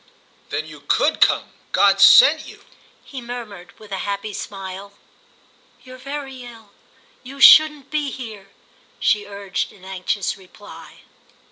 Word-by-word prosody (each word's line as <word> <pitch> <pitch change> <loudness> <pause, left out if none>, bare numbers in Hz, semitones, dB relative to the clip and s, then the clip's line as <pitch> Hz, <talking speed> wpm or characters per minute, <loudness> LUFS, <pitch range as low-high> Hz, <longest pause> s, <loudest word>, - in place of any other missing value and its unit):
"Then - - -3
you - - -13
could - - 0
come? - - +2 0.2
God 195 -1 +3
sent 290 +10 +7
you!" - - -15 0.4
he 265 -3 -9
murmured 230 -7 -10
with 215 -2 -16
a 190 - -4
happy 200 +1 -5
smile. 195 0 -8 0.9
"You're 255 0 -13
very 275 -1 -7
ill—you 240 +3 -16
shouldn't 295 +1 +6
be 300 -2 -2
here," 220 -7 -10 0.5
she 205 -1 0
urged 200 -2 -5
in 190 -2 -18
anxious 190 +1 -3
reply. 195 +2 -15
210 Hz, 125 wpm, -20 LUFS, 195-265 Hz, 0.9 s, sent